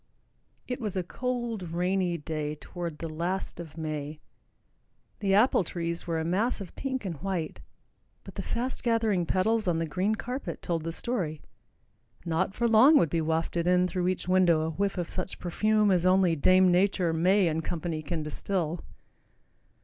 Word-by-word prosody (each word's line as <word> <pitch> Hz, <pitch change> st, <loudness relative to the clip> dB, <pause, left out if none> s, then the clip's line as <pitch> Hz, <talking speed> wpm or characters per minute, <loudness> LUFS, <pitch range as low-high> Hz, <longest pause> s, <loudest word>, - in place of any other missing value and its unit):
It 250 Hz, 0 st, -4 dB
was 210 Hz, -4 st, -3 dB
a 185 Hz, -, 0 dB
cold, 240 Hz, +1 st, -3 dB
rainy 180 Hz, 0 st, 0 dB
day 150 Hz, -1 st, -4 dB
toward 170 Hz, 0 st, -6 dB
the 165 Hz, -, -5 dB
last 170 Hz, +4 st, -3 dB
of 165 Hz, -2 st, -9 dB
May. 155 Hz, -1 st, -4 dB, 1.0 s
The 195 Hz, -2 st, +2 dB
apple 215 Hz, -1 st, +4 dB
trees 170 Hz, 0 st, -2 dB
were 165 Hz, -1 st, 0 dB
a 160 Hz, -, -2 dB
mass 205 Hz, +9 st, 0 dB
of 195 Hz, -3 st, -9 dB
pink 265 Hz, -4 st, -3 dB
and 170 Hz, -5 st, -4 dB
white, 175 Hz, 0 st, -3 dB, 0.6 s
but -, -, -11 dB
the -, -, -4 dB
fast 250 Hz, +3 st, -1 dB
gathering 220 Hz, -7 st, +1 dB
petals 215 Hz, +4 st, +1 dB
on 170 Hz, -2 st, +2 dB
the 165 Hz, -, 0 dB
green 190 Hz, +7 st, 0 dB
carpet 250 Hz, +5 st, -5 dB
told 165 Hz, -2 st, -1 dB
the 165 Hz, -, -2 dB
story; 170 Hz, -7 st, -2 dB, 0.9 s
not 170 Hz, +4 st, 0 dB
for 235 Hz, -, +1 dB
long 245 Hz, +7 st, +7 dB
would 165 Hz, -, +2 dB
be 165 Hz, -, +1 dB
wafted 165 Hz, +2 st, -1 dB
in 180 Hz, 0 st, +4 dB
through 180 Hz, -1 st, -1 dB
each 185 Hz, -1 st, -2 dB
window 180 Hz, -3 st, +4 dB
a 160 Hz, +1 st, -1 dB
whiff 195 Hz, +4 st, -1 dB
of 175 Hz, -2 st, -2 dB
such 185 Hz, 0 st, -4 dB
perfume 210 Hz, +3 st, +2 dB
as 180 Hz, -2 st, +2 dB
only 185 Hz, -2 st, +4 dB
Dame 185 Hz, +4 st, +5 dB
Nature, 180 Hz, -2 st, +2 dB
May 185 Hz, +4 st, +3 dB
and 160 Hz, 0 st, -1 dB
Company 165 Hz, -1 st, -3 dB
can 155 Hz, +1 st, -3 dB
distill. 170 Hz, +2 st, -2 dB
180 Hz, 170 wpm, -28 LUFS, 165-200 Hz, 1.0 s, long